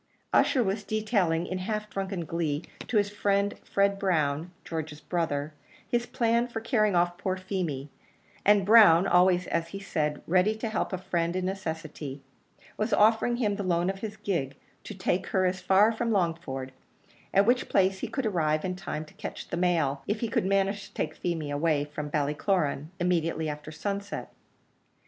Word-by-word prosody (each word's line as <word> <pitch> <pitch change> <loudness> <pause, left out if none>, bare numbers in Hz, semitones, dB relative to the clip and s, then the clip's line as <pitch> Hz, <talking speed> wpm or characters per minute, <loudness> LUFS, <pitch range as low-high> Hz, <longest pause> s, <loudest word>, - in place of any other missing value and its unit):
Ussher 255 - +4
was 200 +1 -1
detailing 205 -7 0
in 185 +1 -3
half 210 +2 -3
drunken 195 -4 -4
glee 160 -1 -2 0.2
to 230 - +1
his 205 0 +2
friend 200 0 +1
Fred 200 0 +1
Brown, 160 -4 0 0.2
George's 160 -2 -5
brother, 155 -3 -2 0.3
his 240 0 0
plan 235 -1 +1
for 235 -2 -4
carrying 215 -4 +1
off 175 0 +1
poor 190 -2 -1
Feemy; 180 -8 -3 0.6
and 205 -1 +5
Brown, 200 -5 +7
always 180 -1 +4
as 165 0 -1
he 195 - -7
said, 150 -6 -2
ready 185 +5 +3
to 220 +1 -3
help 215 - -1
a 185 - -1
friend 170 -1 -1
in 185 0 -1
necessity, 160 -7 -5 0.5
was 215 - -1
offering 225 +3 +4
him 210 -5 0
the 205 - -3
loan 175 0 +1
of 195 - -10
his 215 0 -6
gig 140 -9 -2 0.3
to 210 - -7
take 185 0 -1
her 185 -1 +1
as 185 0 0
far 195 +3 +5
as 225 - -8
Longford, 170 - -1 0.6
at 195 +1 +4
which 245 +3 +2
place 190 0 +2
he - - -3
could 270 - -3
arrive 155 -6 +1
in 185 0 -2
time 155 -4 -5
to - - -18
catch - - -7
the - - -2
mail, 165 -6 +1
if 210 +1 -1
he 230 - -1
could - - 0
manage 195 +1 +1
to - - -23
take 155 - -2
Feemy 160 -4 -3
away 145 0 +1
from 150 0 -6
Ballycloran 150 +1 0
immediately 165 -3 0
after 150 0 -6
sunset. 200 +5 -4
185 Hz, 175 wpm, -28 LUFS, 160-205 Hz, 0.6 s, Brown